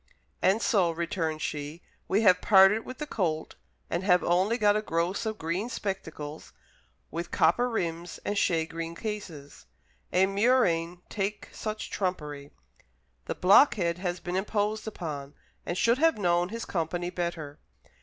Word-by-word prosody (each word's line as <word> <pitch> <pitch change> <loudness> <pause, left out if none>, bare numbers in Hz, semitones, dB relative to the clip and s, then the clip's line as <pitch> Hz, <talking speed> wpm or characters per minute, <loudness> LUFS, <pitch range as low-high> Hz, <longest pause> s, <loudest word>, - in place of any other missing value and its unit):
"And 200 +5 +3
so," 190 -6 +3
returned 165 -1 -2
she, 150 +3 -5 0.2
"we 200 +3 +2
have 180 -3 +5
parted 205 +1 +6
with 255 - -8
the 300 - -4
colt, 165 - -2 0.3
and 170 +2 -2
have 180 -2 +4
only 185 +7 +2
got 210 -3 +4
a 215 - +1
gross 175 +3 -1
of 215 -1 -3
green 175 +8 -2
spectacles, 160 -9 -5 0.6
with 170 +2 -4
copper 245 +1 +3
rims 170 -6 -3
and 205 - -1
shagreen 165 -2 -1
cases! 170 - -7 0.4
A 185 +1 +4
murrain 190 -5 +1
take 205 0 -3
such 215 0 -5
trumpery! 150 -7 -3 0.8
The - - -3
blockhead 180 - +4
has 180 -1 -2
been 175 +1 -4
imposed 210 +2 -1
upon, 150 -8 -6 0.3
and 175 - -2
should 235 +5 +3
have 325 -3 +4
known 175 -2 +1
his 230 +2 -5
company 175 +1 -2
better." 165 -4 -4
180 Hz, 145 wpm, -28 LUFS, 165-210 Hz, 0.8 s, parted